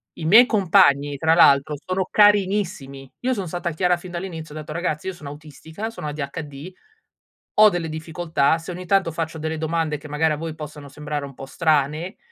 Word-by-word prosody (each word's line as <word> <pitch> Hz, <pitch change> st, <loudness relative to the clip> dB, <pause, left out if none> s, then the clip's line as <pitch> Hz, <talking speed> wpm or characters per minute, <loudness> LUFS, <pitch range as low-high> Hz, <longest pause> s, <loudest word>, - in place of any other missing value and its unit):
I 165 Hz, -, -7 dB
miei 220 Hz, +10 st, +8 dB
compagni, 145 Hz, -, +3 dB
tra 160 Hz, +3 st, +3 dB
l'altro, 145 Hz, -2 st, +5 dB
sono 185 Hz, +5 st, -3 dB
carinissimi. 190 Hz, -10 st, +2 dB
Io 255 Hz, +1 st, 0 dB
son 195 Hz, -3 st, -4 dB
stata 175 Hz, +1 st, -3 dB
chiara 180 Hz, +2 st, +1 dB
fin 180 Hz, +1 st, -11 dB
dall'inizio, 170 Hz, -4 st, -6 dB
ho -, -, -6 dB
detto: 155 Hz, 0 st, -8 dB
"Ragazzi, 165 Hz, -2 st, -3 dB
io 190 Hz, -, -2 dB
sono 155 Hz, -5 st, -10 dB
autistica, 155 Hz, +7 st, -8 dB
sono 190 Hz, -9 st, -7 dB
ADHD, 145 Hz, +2 st, -6 dB, 0.8 s
ho 215 Hz, 0 st, +8 dB
delle 175 Hz, -4 st, -3 dB
difficoltà. 160 Hz, -1 st, 0 dB
Se 165 Hz, -, -11 dB
ogni 180 Hz, +1 st, -7 dB
tanto 195 Hz, -2 st, +2 dB
faccio 160 Hz, 0 st, -4 dB
delle 160 Hz, +1 st, -3 dB
domande 160 Hz, -1 st, -1 dB
che 145 Hz, -, -12 dB
magari 155 Hz, +2 st, +1 dB
a -, -, -1 dB
voi 160 Hz, +1 st, -5 dB
possono 150 Hz, -2 st, -9 dB
sembrare 150 Hz, 0 st, -5 dB
un 140 Hz, -, -10 dB
po' 135 Hz, -, -9 dB
strane, 155 Hz, +4 st, 0 dB
160 Hz, 190 wpm, -22 LUFS, 150-180 Hz, 0.8 s, miei